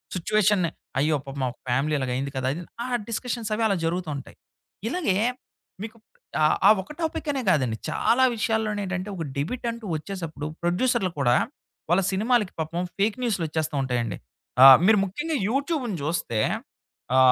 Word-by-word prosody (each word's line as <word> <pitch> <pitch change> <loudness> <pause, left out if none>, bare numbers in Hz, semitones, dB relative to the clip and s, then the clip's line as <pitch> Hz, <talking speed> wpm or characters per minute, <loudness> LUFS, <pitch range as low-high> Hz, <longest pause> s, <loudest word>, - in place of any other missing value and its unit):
సిచ్యువేషన్‌ని 200 -1 +2 0.3
"అయ్యో! 150 +2 +2
పాపం 135 0 -5
ఆ - - 0 0.2
ఫ్యామిలీ 135 +5 +1
ఇలాగ 130 -2 -2
అయింది 135 +2 -2
కదా!" 130 0 -1
అది 170 +4 -6 0.2
ఆ - - -4 0.2
డిస్కషన్స్ 230 -1 -3
అవి 220 +2 0
అలా 200 - +1
జరుగుతూ 170 0 -1
ఉంటాయి. 135 - -10 0.5
ఇలాగే, 250 - 0 0.7
మీకు 225 +1 -8 0.5
ఆహ్, 155 - +4
ఆ - - +9
ఒక్ 190 - -12
టాపిక్ 320 -1 -2
అనే 275 -2 -2
కాదండి. 130 -9 +1
చాలా 235 +10 +2
విషయాల్లోనేంటంటే 210 -4 -1
ఒక 170 - -4
డెబిట్ 200 - -3
అంటూ 230 -1 -9
వచ్చేసప్పుడు 165 -3 -6 0.2
ప్రొడ్యూసర్లు 185 +3 +1
కూడా 120 -3 +4 0.5
వాళ్ళ 175 +3 +4
సినిమాలకి 215 +1 +1
పాపం 160 +2 -2 0.2
ఫేక్ 205 +2 +2
న్యూసులు 220 -8 0
వచ్చేస్తూ 155 -1 -2
ఉంటాయండి. 120 -6 -1 0.5
ఆ! - - +12 0.2
మీరు 215 +1 +6
ముఖ్యంగా 295 - -3
యూట్యూబ్‌ని 270 - -1
జూస్తే, 150 -7 -1 0.8
ఆ - - +5
185 Hz, 155 wpm, -25 LUFS, 150-225 Hz, 0.8 s, ఆ